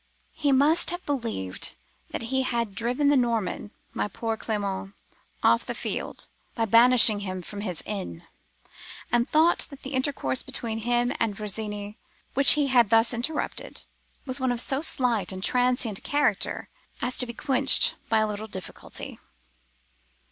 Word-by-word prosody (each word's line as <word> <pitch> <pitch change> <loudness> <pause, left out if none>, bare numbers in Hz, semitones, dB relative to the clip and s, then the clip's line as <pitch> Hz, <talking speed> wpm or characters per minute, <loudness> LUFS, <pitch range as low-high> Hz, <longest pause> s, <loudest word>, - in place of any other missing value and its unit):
He 290 -2 0
must 295 +6 +4
have 350 +1 -2
believed 230 - -3 0.3
that - - -5
he 265 - +3
had 235 -5 -2
driven 245 +8 +1
the 290 - +4
Norman 230 -5 -1 0.2
(my - - -1
poor 225 +3 -3
Clement!) 200 -3 -4 0.5
off - - +4
the - - -5
field, - - -3 0.3
by 225 - 0
banishing 230 -1 +6
him 185 -2 -5
from 205 +3 -7
his 180 -6 -3
inn; 190 - -6 0.9
and 240 0 +2
thought 320 +3 +3
that 280 -1 -13
the 270 +1 -6
intercourse 260 - 0
between 235 -4 -4
him 240 +2 0
and 220 -3 0
Virginie, 210 0 -5 0.3
which 275 +1 +8
he 295 -1 +1
had 245 -5 +4
thus 225 +2 +4
interrupted, 250 +7 -3 0.4
was 260 0 -1
of 245 -2 0
so 265 +3 +2
slight 240 - +1
and 190 0 -7
transient 245 -4 +2
a - - -21
character 290 0 0 0.3
as 250 - -2
to 250 - +5
be 235 - -6
quenched 270 0 +3 0.2
by 225 - +3
a 215 0 +2
little 210 +1 -5
difficulty. 190 -4 -8
235 Hz, 155 wpm, -26 LUFS, 210-265 Hz, 0.9 s, which